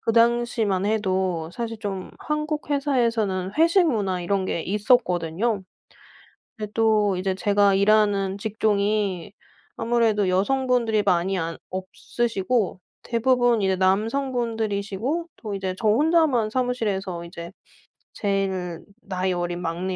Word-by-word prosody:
그 225 Hz, -, 0 dB
당시만 230 Hz, -4 st, +2 dB
해도 190 Hz, -6 st, 0 dB
사실 230 Hz, 0 st, -5 dB
좀 195 Hz, -3 st, -5 dB
한국 300 Hz, 0 st, -3 dB
회사에서는 230 Hz, -10 st, 0 dB
회식 335 Hz, +3 st, +5 dB
문화 200 Hz, -, 0 dB
이런 190 Hz, +2 st, 0 dB
게 170 Hz, -, -2 dB
있었거든요. 200 Hz, -1 st, +1 dB, 0.9 s
근데 210 Hz, -1 st, -6 dB
또 215 Hz, -3 st, +3 dB
이제 185 Hz, +1 st, -1 dB
제가 200 Hz, 0 st, +3 dB
일하는 200 Hz, -1 st, +2 dB
직종이 205 Hz, -3 st, 0 dB, 0.4 s
아무래도 225 Hz, -4 st, +1 dB
여성분들이 230 Hz, +2 st, +1 dB
많이 185 Hz, 0 st, +1 dB
안 165 Hz, -1 st, -3 dB
없으시고 195 Hz, +2 st, -2 dB, 0.2 s
대부분 245 Hz, -1 st, +2 dB
이제 190 Hz, -1 st, +2 dB
남성분들이시고 225 Hz, -, -1 dB
또 210 Hz, -3 st, -6 dB
이제 190 Hz, -1 st, -3 dB
저 220 Hz, -, +1 dB
혼자만 285 Hz, -2 st, +3 dB
사무실에서 210 Hz, -8 st, -2 dB
이제 170 Hz, 0 st, -8 dB, 0.6 s
제일 190 Hz, -4 st, -2 dB, 0.2 s
나이 185 Hz, -1 st, -2 dB
어린 175 Hz, 0 st, -3 dB
막내 180 Hz, +2 st, -3 dB
205 Hz, 275 characters per minute, -24 LUFS, 190-235 Hz, 0.9 s, 회식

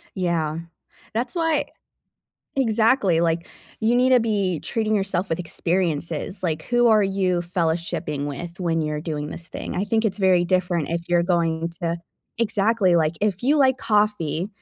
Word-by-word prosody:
Yeah. 170 Hz, -4 st, -1 dB, 0.6 s
That's 240 Hz, +6 st, -2 dB
why 325 Hz, -4 st, +1 dB, 0.9 s
Exactly. 220 Hz, -7 st, +3 dB
Like, 170 Hz, 0 st, 0 dB, 0.3 s
you 225 Hz, +2 st, +2 dB
need 250 Hz, +1 st, +4 dB
to 255 Hz, -, +7 dB
be 200 Hz, -7 st, 0 dB
treating 220 Hz, -2 st, -1 dB
yourself 195 Hz, -2 st, 0 dB
with 165 Hz, -, -1 dB
experiences. 170 Hz, 0 st, -2 dB
Like, 160 Hz, -3 st, -1 dB
who 240 Hz, +4 st, +2 dB
are 215 Hz, -2 st, +5 dB
you 190 Hz, -2 st, +1 dB
fellowshipping 165 Hz, -3 st, -2 dB
with 170 Hz, +4 st, -6 dB
when 165 Hz, -3 st, 0 dB
you're 150 Hz, -1 st, -2 dB
doing 150 Hz, -2 st, -3 dB
this 170 Hz, +2 st, -8 dB
thing? -, -, -6 dB
I 190 Hz, -, 0 dB
think 220 Hz, +1 st, +1 dB
it's 200 Hz, -, -1 dB
very 190 Hz, -3 st, +4 dB
different 180 Hz, -3 st, 0 dB
if 170 Hz, 0 st, -3 dB
you're 175 Hz, 0 st, +3 dB
going 165 Hz, -2 st, 0 dB
to 170 Hz, 0 st, -1 dB, 0.4 s
Exactly. 210 Hz, -4 st, +2 dB
Like, 155 Hz, -2 st, +2 dB
if 200 Hz, -3 st, 0 dB
you 285 Hz, +5 st, +3 dB
like 260 Hz, -2 st, +4 dB
coffee, 210 Hz, -6 st, 0 dB
180 Hz, 160 wpm, -23 LUFS, 165-215 Hz, 0.9 s, to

